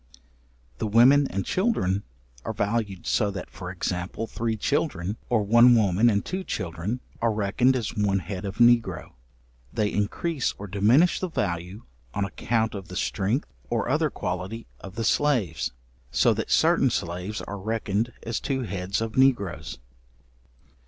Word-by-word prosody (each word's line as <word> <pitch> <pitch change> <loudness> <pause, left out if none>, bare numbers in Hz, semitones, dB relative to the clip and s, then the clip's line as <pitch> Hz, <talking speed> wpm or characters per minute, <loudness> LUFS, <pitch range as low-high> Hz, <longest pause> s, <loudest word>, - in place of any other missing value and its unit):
The 110 - -1
women 130 +6 +6
and 95 0 -3
children 185 - +1 0.4
are - - -3
valued, 100 -4 -2
so 105 -3 +2
that, 95 -2 -6
for 90 -2 -7
example, 90 +3 -3
three 115 0 -2
children, 105 - -1
or 115 -3 +2
one 120 +4 +6
woman 105 +1 +4
and 100 -2 0
two 190 +1 -3
children 95 - -3 0.2
are 115 -1 +3
reckoned 110 +5 +2
as 120 -5 -2
one 100 -2 +2
head 95 +2 -5
of 100 0 -5
negro. 120 -7 +3 0.6
They 105 -2 0
increase 130 +8 -1
or 100 - -7
diminish 110 - +3
the 185 - -2
value 90 - -3 0.3
on 100 - 0
account 110 +2 -1
of 95 -3 -7
the 90 - -9
strength 105 +7 -1 0.2
or - - -1
other - - +2
quality 95 +6 -4
of 95 0 -10
the 115 - -2
slaves, 115 - +1 0.4
so - - +3
that - - -4
certain - - +4
slaves 90 +5 -3
are 100 - -6
reckoned 110 +2 -1
as 115 -2 -2
two 135 -1 -2
heads 100 -1 -2
of 115 -1 -3
negroes. 100 - +1
105 Hz, 150 wpm, -26 LUFS, 95-120 Hz, 0.6 s, women